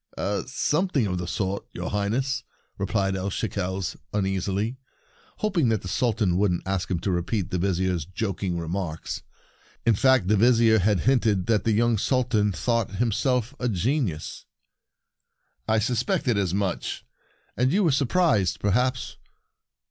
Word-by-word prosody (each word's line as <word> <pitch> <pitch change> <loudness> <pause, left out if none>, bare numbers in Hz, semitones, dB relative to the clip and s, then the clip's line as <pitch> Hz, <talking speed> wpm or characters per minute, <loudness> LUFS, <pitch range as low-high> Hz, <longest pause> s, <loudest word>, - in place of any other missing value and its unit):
" 100 - -1
Something 150 - +1
of 90 -3 -2
the 90 - -4
sort, 95 +2 -2
your 90 +1 -4
Highness," 125 +6 -1 0.4
replied 95 -1 0
El 95 +1 -2
Shekels 95 -2 -3 0.2
uneasily, 100 +4 -1 0.6
hoping 180 - +1
that 110 -3 0
the - - -5
Sul 120 +7 +1
tan 95 -5 +1
wouldn't 95 -3 +1
ask 95 -1 -2
him 90 - 0
to 95 - -1
repeat 90 +2 -1
the 90 - 0
Vizier's 90 -3 0
joking 95 -1 -3
remarks. 85 -1 -4 0.6
In 115 - +5
fact, 130 -2 +3
the 105 - +4
Vizier 115 0 +5
had 100 -2 +2
hinted 110 -6 +2
that 105 -2 +1
the 115 - +3
young 115 0 +2
Sultan 120 -4 +1
thought 115 -1 -1
him 115 +3 +1
self 125 +2 0
a 125 - 0
genius. 105 - -2 1.2
"I 110 0 +3
suspected 125 - +1
as 100 -4 0
much," 100 0 +1
said - - -7
the - - -5
Sultan. - - -12
"And 130 - +2
you 200 +5 +3
were 165 - +3
surprised, 125 - +2
perhaps?" 125 +5 0
105 Hz, 155 wpm, -25 LUFS, 95-125 Hz, 1.2 s, In